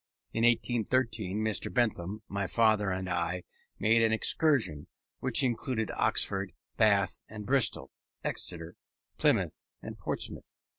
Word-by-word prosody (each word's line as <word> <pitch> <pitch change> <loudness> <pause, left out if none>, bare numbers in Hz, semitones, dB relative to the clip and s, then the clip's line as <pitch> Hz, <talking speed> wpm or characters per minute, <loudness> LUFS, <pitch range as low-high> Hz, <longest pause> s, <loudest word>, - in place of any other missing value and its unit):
In 115 - 0
1813 115 -3 +1
Mr. 110 -5 -1
Bentham, 110 -4 -1
my 100 -1 -2
father, 110 -2 +2
and 95 0 -3
I 90 0 -2 0.3
made 115 +2 +3
an 110 -1 +3
excursion, 110 - +2 0.3
which 130 +1 +4
included 120 -2 -1
Oxford, 95 -2 0 0.2
Bath 100 -3 +2
and 105 -1 -8
Bristol, 125 -2 +1 0.3
Exeter, 85 -1 -3 0.4
Plymouth, - - +1 0.2
and - - -9
Portsmouth. - - -3
110 Hz, 115 wpm, -30 LUFS, 95-115 Hz, 0.4 s, which